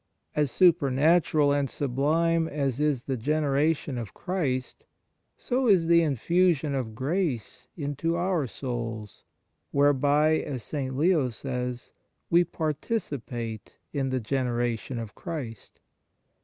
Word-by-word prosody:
As 150 -2 +2
supernatural 155 -2 +4
and 140 -2 0
sublime 160 +5 +1
as 140 -4 -2
is 145 -5 +1
the 135 - -2
generation 145 +1 0
of 115 -5 -7
Christ, 135 -9 -2 0.5
so 255 0 0
is 190 -6 +5
the 170 0 +5
in 150 -4 +1
fusion 170 +1 +2
of 120 -5 -3
grace 130 - -2
into 145 +2 -1
our 175 -5 0
souls, 115 -4 -5 0.5
whereby, 145 +2 +3
as 130 -5 -5
St. 130 -3 -4
Leo 155 -4 +3
says, 125 0 -5 0.4
we 170 +1 +6
participate 140 - -4 0.2
in 135 -3 -1
the 130 0 0
generation 120 0 -1
of 115 -2 -6
Christ. 135 - -7
140 Hz, 115 wpm, -27 LUFS, 125-165 Hz, 0.5 s, we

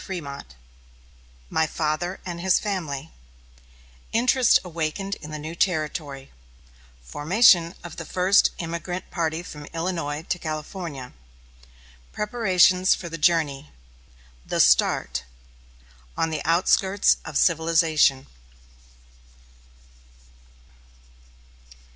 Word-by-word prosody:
FRÉMONT 145 -7 -6 1.1
MY 160 0 +1
FATHER 160 +4 -2
AND 170 -2 -5
HIS 185 0 +3
FAMILY 165 -8 -4 1.0
INTEREST 245 +1 +4
AWAKENED 170 +3 -3
IN 150 - -9
THE 155 - -5
NEW 155 +2 -7
TERRITORY 155 -6 -2 0.7
FORMATION 170 - +3
OF 175 -2 -9
THE 165 - -6
FIRST 185 +4 +3
EMIGRANT 170 +2 -5
PARTY 165 -1 -2
FROM 150 -4 -10
ILLINOIS 165 -3 -3
TO 175 - -2
CALIFORNIA 155 -3 -6 1.0
PREPARATIONS 190 -4 +3
FOR 170 - -8
THE 165 0 -7
JOURNEY 150 -4 +1 0.7
THE - - -3
START 60 0 +3 0.9
ON 165 - 0
THE 155 - -3
OUTSKIRTS 190 +4 +3
OF 160 -4 -4
CIVILIZATION. 160 -5 +3
165 Hz, 90 wpm, -24 LUFS, 150-185 Hz, 1.1 s, INTEREST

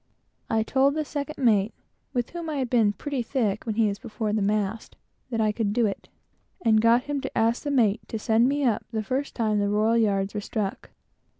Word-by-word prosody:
I 220 0 +2
told 270 +5 +2
the 310 -1 -1
second 290 +1 -5
mate, 220 -5 +2 0.4
with 245 -2 -2
whom 340 -2 -5
I 305 - -2
had 260 -4 -2
been 225 -4 +4
pretty 275 +5 -3
thick 225 -4 -1
when 220 - -1
he 225 -1 +3
was 200 0 -3
before 220 -3 -3
the 215 - +1
mast, 210 +1 -1 0.3
that 230 -3 -2
I 215 -1 +2
would 210 -3 0
do 235 0 +2
it, 200 - -4 0.5
and 220 -2 +4
got 230 +2 +4
him 290 -1 -3
to 265 - -5
ask 230 +2 +2
the 290 - -3
mate 235 -6 +2
to 225 - -4
send 225 +3 +3
me 285 +1 0
up 235 -5 +1
the 220 -2 -2
first 260 +7 -3
time 215 -3 +1
they 205 - +1
were 210 -2 +2
struck. 205 -1 -4
225 Hz, 210 wpm, -26 LUFS, 210-260 Hz, 0.5 s, been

